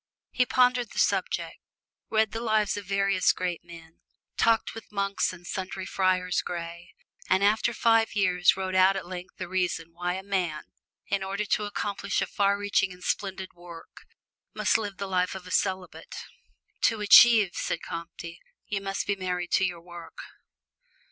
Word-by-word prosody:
He 250 -1 +1
pondered 250 -2 +2
the - - -11
subject, - - 0 0.5
read 220 -1 +2
the 225 - -4
lives 215 -2 +1
of 205 -1 -6
various 195 -1 +2
great 180 -2 -3
men, 165 -1 -14 0.3
talked 225 -1 +2
with 225 -1 -11
monks 200 -1 0
and 175 -1 -13
sundry 190 +1 -5
friars 185 -2 +1
gray, 170 0 -7 0.3
and 190 +1 +3
after 215 +3 +3
five 225 -1 +2
years 180 -3 +3
wrote 190 -1 -3
out 185 +1 +5
at 195 - -4
length 180 0 -8
the 185 - -5
reasons 175 -3 -1
why 175 +1 -2
a 190 - -6
man, 180 -6 -2 0.4
in 200 0 -1
order 195 +2 -2
to 210 +1 0
accomplish 200 -1 -2
a - - +1
far 200 0 +1
reaching 200 -2 +1
and 180 0 -12
splendid 190 -1 -3
work, 175 -1 -13 0.5
must - - +1
live 205 -3 -5
the 200 - -4
life 185 -1 0
of 190 -1 -8
a 180 - -10
celibate. 185 -1 -2 0.7
"To 225 -2 +1
achieve," 210 -1 +8
said 170 - -3
Comte, 170 0 -7 0.4
"you 200 -1 -3
must 195 0 -3
be 200 - 0
married 180 -2 -3
to - - +3
your 175 -2 -4
work." 175 -1 -12
190 Hz, 170 wpm, -27 LUFS, 180-205 Hz, 0.7 s, achieve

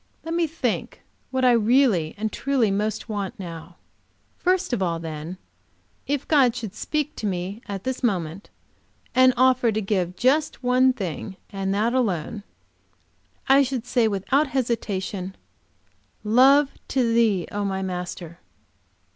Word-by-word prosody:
Let 330 - -4
me 335 -1 +1
think 325 +2 -3 0.3
what 260 -1 0
I 250 - +6
really 230 - +3
and 215 0 -3
truly 265 -7 +1
most 210 +3 -2
want 205 -4 -4
now. 170 -1 -8 0.6
First 365 -4 +1
of 225 - 0
all, 170 -3 0
then, 160 +2 -6 0.7
if 285 -1 -2
God 265 -6 +4
should 220 -5 -5
speak 300 +6 -2
to 215 - -2
me 190 +3 -3
at 195 -1 -5
this 260 -1 -3
moment 190 -6 -2 0.6
and 255 0 +6
offer 255 -2 +4
to 215 - -1
give 190 -4 -1
just 290 - +1
one 255 +1 +4
thing, 190 -3 -5
and 195 -1 -2
that 225 +4 +1
alone, 210 -5 -1 1.1
I 270 +1 +6
should 260 -3 -2
say 245 -2 +2
without 220 +9 +1
hesitation, 205 -7 -2 0.9
Love 265 +6 +5 0.2
to 260 -1 +1
Thee, 220 -6 +3
O 205 0 -2
my 190 -1 -2
Master! 180 -2 -5
220 Hz, 140 wpm, -24 LUFS, 190-260 Hz, 1.1 s, I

